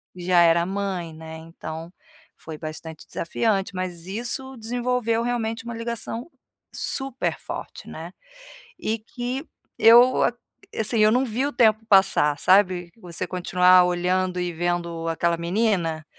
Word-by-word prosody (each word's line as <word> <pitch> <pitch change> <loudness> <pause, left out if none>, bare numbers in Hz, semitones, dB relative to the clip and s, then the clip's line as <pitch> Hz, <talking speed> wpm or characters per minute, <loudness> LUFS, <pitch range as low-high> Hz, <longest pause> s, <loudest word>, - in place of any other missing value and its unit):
já 175 0 +3
era 170 0 +5
mãe, 190 -3 -3
né, 160 0 -9
então, 165 0 -8 0.5
foi 160 -2 -7
bastante 160 0 -8
desafiante. 195 +3 -1
Mas 180 -1 -5
isso 245 +5 -4
desenvolveu 235 0 -1
realmente 235 -1 -2
um - - -4
ligação 230 +2 -5 0.5
super 270 -2 -2
forte, - - -8
né. - - -8 0.7
E 220 +1 -1
que 245 +6 -5 0.3
eu, 240 +3 +7 0.5
assim, 220 +1 -1
eu 215 0 +5
não 250 +3 +3
vi 245 +4 -1
o 290 - -3
tempo 220 -2 +3
passar, 190 -7 +4
sabe. 185 -2 +3
Você 175 -4 -5
continuar 180 0 +4
olhando 180 +1 0
e 180 -1 -2
vendo 170 -1 -2
aquela 170 +1 0
menina, 170 -3 0
185 Hz, 130 wpm, -24 LUFS, 170-230 Hz, 0.7 s, eu